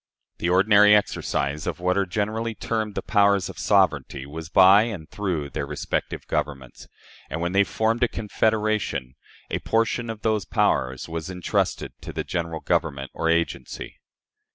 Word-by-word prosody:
The 85 Hz, -, 0 dB
ordinary 105 Hz, +3 st, +6 dB
exercise 75 Hz, -7 st, -1 dB
of -, -, -3 dB
what 90 Hz, +1 st, +1 dB
are 100 Hz, -1 st, +1 dB
generally 110 Hz, +4 st, -2 dB
termed 110 Hz, -2 st, -3 dB
the -, -, -3 dB
powers 100 Hz, -3 st, +3 dB
of -, -, -9 dB
sovereignty 75 Hz, -9 st, +1 dB
was 80 Hz, +3 st, -8 dB
by 95 Hz, +4 st, +7 dB
and 100 Hz, -10 st, -6 dB
through 85 Hz, -9 st, -3 dB
their -, -, -3 dB
respective -, -, -3 dB
governments; 65 Hz, -4 st, -4 dB, 0.4 s
and, -, -, -4 dB
when 85 Hz, +1 st, -1 dB
they 100 Hz, +1 st, +4 dB
formed 110 Hz, +3 st, 0 dB
a 120 Hz, -, +4 dB
confederation, 110 Hz, -, -1 dB, 0.4 s
a -, -, -1 dB
portion 115 Hz, +1 st, 0 dB
of 110 Hz, -1 st, -6 dB
those 110 Hz, -3 st, +1 dB
powers 65 Hz, 0 st, 0 dB
was 80 Hz, 0 st, -5 dB
intrusted 90 Hz, -2 st, -1 dB
to -, -, -7 dB
the -, -, -3 dB
General 85 Hz, -2 st, -3 dB
Government, 75 Hz, -6 st, -1 dB
or 80 Hz, -, -1 dB
agency. 85 Hz, 0 st, -2 dB
95 Hz, 155 wpm, -24 LUFS, 80-105 Hz, 0.4 s, by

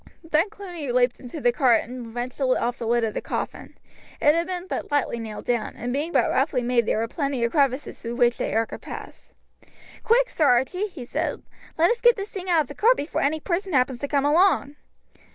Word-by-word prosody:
Then 325 Hz, +4 st, +1 dB
Cluny 355 Hz, -10 st, -6 dB
leapt 245 Hz, 0 st, +2 dB
into 255 Hz, +5 st, -8 dB
the 245 Hz, -3 st, +3 dB
cart 245 Hz, -2 st, +3 dB
and 240 Hz, -1 st, -9 dB
wrenched 245 Hz, +3 st, -5 dB
off 255 Hz, -2 st, +1 dB
the 230 Hz, -, -4 dB
lid 235 Hz, 0 st, +2 dB
of 220 Hz, -2 st, -1 dB
the -, -, -3 dB
coffin. -, -, -5 dB, 0.4 s
It 295 Hz, -, +5 dB
had 335 Hz, +1 st, 0 dB
been 365 Hz, -1 st, -4 dB
but -, -, -4 dB
lightly 290 Hz, -5 st, 0 dB
nailed 220 Hz, -2 st, -7 dB
down, 240 Hz, -2 st, -1 dB
and 245 Hz, +2 st, -4 dB
being 300 Hz, +5 st, -2 dB
but -, -, +3 dB
roughly 250 Hz, -3 st, +1 dB
made 235 Hz, -2 st, +1 dB
there -, -, +1 dB
were 225 Hz, +1 st, 0 dB
plenty 275 Hz, -1 st, -2 dB
of 235 Hz, -, +1 dB
crevices 275 Hz, -2 st, 0 dB
through 235 Hz, 0 st, -4 dB
which 240 Hz, -1 st, +2 dB
the -, -, -1 dB
air 225 Hz, +1 st, +1 dB
could -, -, -9 dB
pass. -, -, -10 dB, 0.7 s
"Quick, -, -, +3 dB
Sir 310 Hz, -, +1 dB
Archie!" 265 Hz, -, +2 dB
he 320 Hz, -11 st, -9 dB
said, -, -, -3 dB, 0.3 s
"let 335 Hz, +5 st, +4 dB
us 475 Hz, 0 st, -2 dB
get 480 Hz, -1 st, +6 dB
this 400 Hz, 0 st, -6 dB
thing 375 Hz, -1 st, -6 dB
out 335 Hz, -3 st, +4 dB
of 295 Hz, -, -5 dB
the 285 Hz, -, -8 dB
cart 470 Hz, +10 st, +4 dB
before 290 Hz, -, -2 dB
any 300 Hz, +3 st, +1 dB
person 370 Hz, +2 st, -2 dB
happen 255 Hz, -2 st, +2 dB
to 285 Hz, -, -3 dB
come 280 Hz, -1 st, +1 dB
along." 300 Hz, -2 st, +3 dB
280 Hz, 225 wpm, -24 LUFS, 245-340 Hz, 0.7 s, get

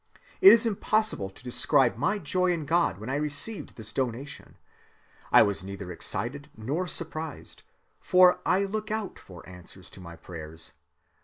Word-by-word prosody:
It 385 Hz, -, +11 dB
is 230 Hz, 0 st, +5 dB
impossible 215 Hz, -, 0 dB
to 95 Hz, -, -16 dB
describe 130 Hz, 0 st, +3 dB
my 145 Hz, -, 0 dB
joy 185 Hz, +1 st, 0 dB
in 165 Hz, -4 st, -2 dB
God 165 Hz, -, +1 dB
when 110 Hz, +3 st, -9 dB
I 140 Hz, -, 0 dB
received 150 Hz, +8 st, -2 dB
this 105 Hz, -2 st, -9 dB
donation. 130 Hz, +2 st, -5 dB, 0.7 s
I -, -, +8 dB
was 100 Hz, -2 st, -1 dB
neither 95 Hz, -1 st, -7 dB
excited 140 Hz, -, -2 dB
nor 145 Hz, +12 st, -3 dB
surprised; 160 Hz, -3 st, -6 dB, 0.4 s
for 180 Hz, 0 st, +5 dB
I 190 Hz, +2 st, +2 dB
look 215 Hz, +2 st, -4 dB
out 215 Hz, -2 st, -4 dB
for 90 Hz, -3 st, -14 dB
answers 90 Hz, +1 st, -13 dB
to 95 Hz, -, -12 dB
my 85 Hz, -2 st, -10 dB
prayers. 80 Hz, -1 st, -8 dB
145 Hz, 155 wpm, -27 LUFS, -, 0.7 s, It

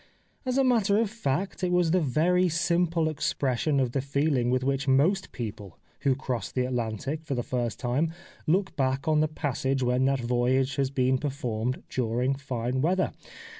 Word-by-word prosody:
As 255 Hz, +1 st, +1 dB
a 270 Hz, -, +4 dB
matter 220 Hz, -6 st, +3 dB
of 220 Hz, -2 st, +1 dB
fact 190 Hz, -, -2 dB
it 180 Hz, -, +1 dB
was 180 Hz, -2 st, +3 dB
the 185 Hz, -, +4 dB
very 175 Hz, +6 st, +2 dB
simple 170 Hz, 0 st, +1 dB
expression 140 Hz, -2 st, 0 dB
of 130 Hz, -3 st, +1 dB
the 135 Hz, -, 0 dB
feeUng 140 Hz, -2 st, +1 dB
with 130 Hz, 0 st, +1 dB
which 135 Hz, +1 st, 0 dB
most 160 Hz, +9 st, +2 dB
people 105 Hz, -6 st, -7 dB, 0.2 s
who 135 Hz, -2 st, +2 dB
cross 130 Hz, -3 st, -3 dB
the 125 Hz, -1 st, 0 dB
Atlantic 125 Hz, +5 st, -3 dB
for 145 Hz, -4 st, -3 dB
the 120 Hz, -, -1 dB
first 120 Hz, -3 st, -2 dB
time 135 Hz, +6 st, 0 dB, 0.4 s
look 190 Hz, +4 st, +1 dB
back 135 Hz, 0 st, 0 dB
on 155 Hz, -1 st, +3 dB
the 155 Hz, -, +3 dB
passage 135 Hz, -3 st, -1 dB
when 125 Hz, +1 st, +2 dB
that 135 Hz, 0 st, +2 dB
voyage 125 Hz, +2 st, +1 dB
has 135 Hz, -1 st, +1 dB
been 130 Hz, -1 st, +1 dB
performed 125 Hz, -4 st, -2 dB
during 125 Hz, +2 st, 0 dB
fine 130 Hz, -2 st, -2 dB
weather. 185 Hz, +5 st, +1 dB
135 Hz, 175 wpm, -27 LUFS, 125-160 Hz, 0.4 s, a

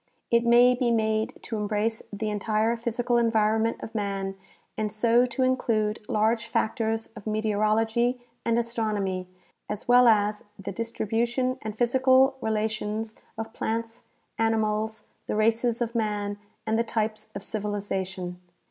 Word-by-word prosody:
It 235 Hz, 0 st, +4 dB
may 240 Hz, +1 st, +7 dB
be 250 Hz, -1 st, +1 dB
made 220 Hz, -1 st, +1 dB
to 225 Hz, -, -3 dB
embrace 210 Hz, +2 st, -1 dB
the 210 Hz, +1 st, -3 dB
entire 215 Hz, +2 st, +1 dB
physical 235 Hz, +1 st, 0 dB
environment 225 Hz, 0 st, +2 dB
of -, -, -7 dB
man 195 Hz, -2 st, -2 dB, 0.4 s
and 215 Hz, -1 st, -2 dB
so 235 Hz, +3 st, +3 dB
to 260 Hz, +2 st, -1 dB
include 225 Hz, -4 st, +1 dB
large 220 Hz, +2 st, +1 dB
factors 225 Hz, 0 st, 0 dB
of 215 Hz, -1 st, -10 dB
meteorology 220 Hz, +3 st, +1 dB, 0.2 s
and 230 Hz, 0 st, +2 dB
astronomy 210 Hz, -6 st, -1 dB, 0.4 s
as 210 Hz, -1 st, -5 dB
well 245 Hz, 0 st, +7 dB
as 210 Hz, -1 st, +3 dB
the 200 Hz, -1 st, -5 dB
distribution 235 Hz, +4 st, -1 dB
and 215 Hz, -1 st, -5 dB
physical 260 Hz, +2 st, +4 dB
relations 220 Hz, 0 st, -2 dB, 0.2 s
of 225 Hz, 0 st, -5 dB
plants, 230 Hz, +1 st, -3 dB, 0.3 s
animals, 220 Hz, -1 st, 0 dB, 0.2 s
the -, -, -1 dB
races 230 Hz, +2 st, +2 dB
of 235 Hz, 0 st, -5 dB
man, 205 Hz, -3 st, -1 dB, 0.3 s
and 220 Hz, +1 st, +1 dB
the -, -, +3 dB
types 220 Hz, -1 st, -2 dB
of 200 Hz, -, -5 dB
civilization. 190 Hz, -4 st, -3 dB
220 Hz, 135 wpm, -27 LUFS, 210-235 Hz, 0.4 s, may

